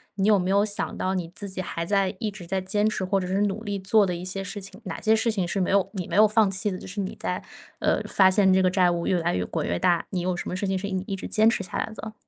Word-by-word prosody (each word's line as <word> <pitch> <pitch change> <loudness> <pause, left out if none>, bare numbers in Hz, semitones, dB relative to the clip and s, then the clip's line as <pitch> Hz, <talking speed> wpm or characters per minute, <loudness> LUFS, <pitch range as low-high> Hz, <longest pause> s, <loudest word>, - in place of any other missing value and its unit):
你 195 0 +1
有 215 -1 +6
没 180 0 -1
有 200 +2 +3
想 205 -1 -3
到 185 - -1
你 175 -3 -3
自 200 - -5
己 190 0 -3
还 170 -2 -4
在 195 +1 +1
一 215 - -1
直 195 -3 -10
在 190 +2 0
坚 205 +3 +1
持， 195 -3 -3
或 195 +1 +1
者 180 - -4
是 190 +2 0
努 205 +2 -2
力 205 -2 -3
做 205 +3 +4
的 180 -2 -2
一 175 +1 -6
些 195 +1 -3
事 200 +2 -5
情， 195 +2 -7
哪 190 - -5
些 220 0 +3
事 225 +1 +1
情 190 -5 -1
是 195 +3 -1
没 180 - 0
有 200 -1 +3
你 185 -4 -4
没 - - -4
有 215 +1 +7
放 215 -1 +3
弃 200 +3 0
的？ 185 - -4
就 - - -10
是 200 +3 -6
你 190 -1 -3
在 - - -2 0.4
呃， - - +1
发 190 -1 +5
现 190 0 +4
这 190 - +4
个 185 - +4
债 185 -1 +4
务 170 -1 -2
越 180 - +2
来 175 +1 0
越 90 - -1
滚 - - -3
越 85 - 0
大， 175 -2 +2
你 185 - -2
有 180 0 -1
什 175 - -5
么 - - -3
事 200 - -2
情 190 0 0
是 200 +2 -4
一 190 - -1
一 195 - -2
直 190 - -7
坚 220 +1 +3
持 230 - -1
下 185 - -5
来 - - -2
的？ 220 0 -7
190 Hz, 350 characters per minute, -25 LUFS, 185-205 Hz, 0.4 s, 有